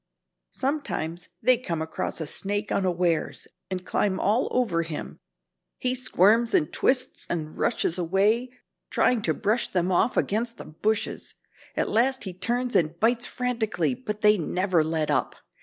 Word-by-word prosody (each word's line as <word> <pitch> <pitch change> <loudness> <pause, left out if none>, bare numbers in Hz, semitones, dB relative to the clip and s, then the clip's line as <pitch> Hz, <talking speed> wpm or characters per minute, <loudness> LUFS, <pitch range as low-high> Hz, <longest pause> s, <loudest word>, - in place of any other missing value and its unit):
Sometimes 260 - -3
they 255 -1 +5
come 175 -9 -3
across 160 +1 -3
a 160 - -3
snake 205 +6 -2
unawares, 180 -3 0 0.2
and 185 -1 -4
climb 190 -2 0
all 220 +6 +2
over 220 -10 +1
him. 165 -2 -6 0.6
He 250 0 0
squirms 230 -2 +3
and 150 - +2
twists 255 -1 0
and 155 -2 -3
rushes 170 - +1
away, 200 +8 +2 0.4
trying 245 -3 +2
to 160 -6 0
brush 220 +4 +1
them 180 0 +1
off, 180 +7 +2
against 230 +3 0
the - - -8
bushes. 210 +8 -2 0.4
At - - +1
last 260 +4 +1
he 190 - -5
turns 240 +7 -2
and 165 0 +2
bites 235 +1 +2
frantically, 220 - -1
but 210 +10 -6
they 210 -1 +5
never 180 0 +1
let 160 -1 0
up. - - 0
200 Hz, 150 wpm, -26 LUFS, 170-235 Hz, 0.6 s, they